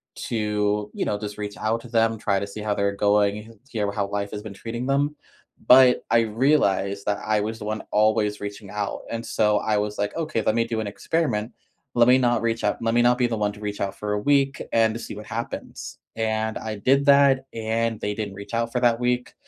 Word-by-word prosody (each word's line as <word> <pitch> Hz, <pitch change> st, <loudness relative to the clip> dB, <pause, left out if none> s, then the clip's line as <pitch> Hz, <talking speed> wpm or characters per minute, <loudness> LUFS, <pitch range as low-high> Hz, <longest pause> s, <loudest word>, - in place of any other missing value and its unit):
to, 105 Hz, -2 st, -1 dB
you -, -, -2 dB
know, 105 Hz, -, -1 dB
just 105 Hz, 0 st, -6 dB
reach 105 Hz, -1 st, -5 dB
out 110 Hz, +2 st, -1 dB
to 120 Hz, -, -12 dB
them, 115 Hz, -1 st, +2 dB
try 100 Hz, -2 st, 0 dB
to 100 Hz, -, -4 dB
see 105 Hz, +1 st, -8 dB
how 105 Hz, -1 st, 0 dB
they're 100 Hz, 0 st, 0 dB
going, 105 Hz, +2 st, +1 dB
hear 105 Hz, -5 st, -1 dB
how 100 Hz, -1 st, -2 dB
life 100 Hz, 0 st, -3 dB
has 105 Hz, -, -5 dB
been 105 Hz, -1 st, -8 dB
treating 115 Hz, +5 st, -5 dB
them, 145 Hz, +2 st, +1 dB, 0.5 s
but 125 Hz, 0 st, +7 dB
I 115 Hz, -, +5 dB
realized 105 Hz, -5 st, +1 dB
that 105 Hz, -1 st, 0 dB
I 105 Hz, -1 st, +1 dB
was 110 Hz, +2 st, -4 dB
the 105 Hz, -, -7 dB
one 110 Hz, +1 st, -3 dB
always 105 Hz, 0 st, +2 dB
reaching 100 Hz, 0 st, -7 dB
out, 105 Hz, 0 st, -3 dB
and 115 Hz, 0 st, -4 dB
so 105 Hz, -1 st, +2 dB
I 110 Hz, -1 st, 0 dB
was 105 Hz, 0 st, -2 dB
like, 105 Hz, 0 st, -2 dB
"Okay, 155 Hz, -8 st, -1 dB
let 110 Hz, -, +1 dB
me 115 Hz, -, +3 dB
do 115 Hz, -1 st, -3 dB
an 110 Hz, -, -3 dB
experiment. 120 Hz, -2 st, -1 dB, 0.4 s
Let 120 Hz, 0 st, +4 dB
me 125 Hz, +1 st, +7 dB
not 120 Hz, -3 st, +2 dB
reach 115 Hz, 0 st, -1 dB
out 105 Hz, -, +1 dB
let 115 Hz, 0 st, 0 dB
me 120 Hz, -, +4 dB
not 120 Hz, +1 st, +4 dB
be 125 Hz, -1 st, +2 dB
the 115 Hz, -, -2 dB
one 105 Hz, -1 st, 0 dB
to 105 Hz, -, -13 dB
reach 105 Hz, -1 st, -5 dB
out 100 Hz, -1 st, -2 dB
for 105 Hz, -1 st, -2 dB
a 105 Hz, -, 0 dB
week 140 Hz, +3 st, +2 dB
and 115 Hz, -1 st, +3 dB
to 115 Hz, -, -5 dB
see -, -, -7 dB
what 105 Hz, -, -8 dB
happens." 115 Hz, +2 st, -6 dB, 0.2 s
And 110 Hz, 0 st, -1 dB
I 110 Hz, -1 st, -5 dB
did 135 Hz, +7 st, +2 dB
that, 140 Hz, -2 st, +5 dB
and 115 Hz, 0 st, -1 dB
they 105 Hz, -, -1 dB
didn't 105 Hz, -2 st, -4 dB
reach 100 Hz, +2 st, -10 dB
out 115 Hz, 0 st, 0 dB
for 125 Hz, -, 0 dB
that 120 Hz, -1 st, +3 dB
week, 125 Hz, 0 st, -1 dB
110 Hz, 235 wpm, -24 LUFS, 105-120 Hz, 0.5 s, but